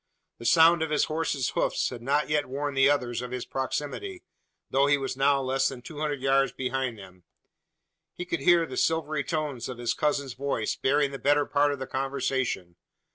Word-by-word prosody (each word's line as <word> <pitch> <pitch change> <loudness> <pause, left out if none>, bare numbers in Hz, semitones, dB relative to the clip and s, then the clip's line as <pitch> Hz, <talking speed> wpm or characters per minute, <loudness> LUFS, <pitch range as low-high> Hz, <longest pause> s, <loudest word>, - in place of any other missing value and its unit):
The 115 - -9
sound 165 0 +6
of 160 - 0
his 150 - +2
horse's 155 -4 -1
hoofs - - 0
had 120 -2 -7
not 145 +4 +1
yet 150 0 0
warned 140 +1 -3
the 135 +1 +5
others 125 -4 0
of 125 - -6
his 125 -1 -4
proximity 150 - -4 0.5
though 140 +1 +3
he 145 0 +4
was 135 -2 -3
now 140 +1 +3
less 135 0 +1
than 125 -3 -9
two 150 +1 -9
hundred 145 -3 -2
yards 135 0 +3
behind 130 -2 -3
them! 95 -2 -14 0.9
He 180 - -5
could 170 -2 -2
hear 170 +3 +4
the - - -7
silvery 155 -3 0
tones 150 -8 -3
of 125 - -6
his 120 -1 -1
cousin's 140 -4 -1
voice 130 -5 -2
bearing 140 +1 +1
the 135 - -6
better 145 +1 +3
part 145 0 +2
of 140 - -3
the 130 - -5
conversation. 130 -9 -2
140 Hz, 195 wpm, -27 LUFS, 130-150 Hz, 0.9 s, sound